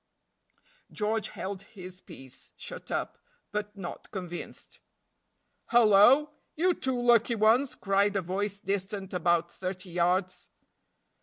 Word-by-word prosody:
George 215 +1 -1
held 195 0 -5
his 185 -2 -11
peace 135 -8 -10
shut - - -8
up, - - -3 0.3
but 210 0 -4
not 175 -3 -7
convinced. 180 -3 -7 0.9
"Hallo! 240 +6 +6 0.2
you 360 +3 +3
two 260 -5 -2
lucky 240 -1 +4
ones," 230 +5 +3
cried 200 +1 +1
a 195 - +1
voice 200 +3 -2
distant 195 0 -3
about 170 -1 +1
thirty 185 -1 -5
yards. 180 +1 0
195 Hz, 110 wpm, -29 LUFS, 185-220 Hz, 0.9 s, Hallo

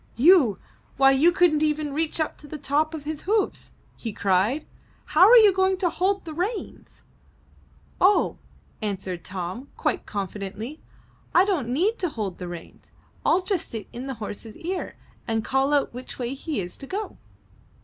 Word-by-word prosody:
''You! 275 - +6 0.4
why 270 0 +6
you 290 +6 +5
couldn't 345 -4 +3
even 300 -1 0
reach 315 +2 -1
up 315 - -1
to 295 - -11
the 305 - -6
top 300 +3 0
of 300 - -7
his 305 0 -4
hoofs!" 425 -2 0 0.2
he 225 - -5
cried. 205 +9 +1 0.4
''How 310 - +2
are - - +9
you 425 -4 +7
going 380 0 +2
to 360 -3 0
hold 390 +1 0
the 320 - -6
reins?" 390 +7 -5 1.0
*'0h," 390 +3 +4 0.4
answered 190 -4 -3
Tom, 185 +7 -5
quite - - -1
confidently, 200 - -5 0.5
"I 365 - +7
don't 335 - 0
need 370 - +1
to 360 - 0
hold 210 -9 -4
the 180 - -5
reins. 175 -1 -10 0.3
I'll 365 - +3
just 375 -3 -2
sit 225 -2 -6
in 250 +3 -6
the 265 - -4
horse's 215 0 -7
ear 360 +2 -4 0.3
and 225 -2 -1
call 270 +2 +1
out 285 -4 +2
which 250 +1 -8
way 245 0 -3
he 285 0 -4
is 180 -2 -5
to 275 - -10
go!" 410 +6 -5
290 Hz, 170 wpm, -25 LUFS, 225-355 Hz, 1.0 s, are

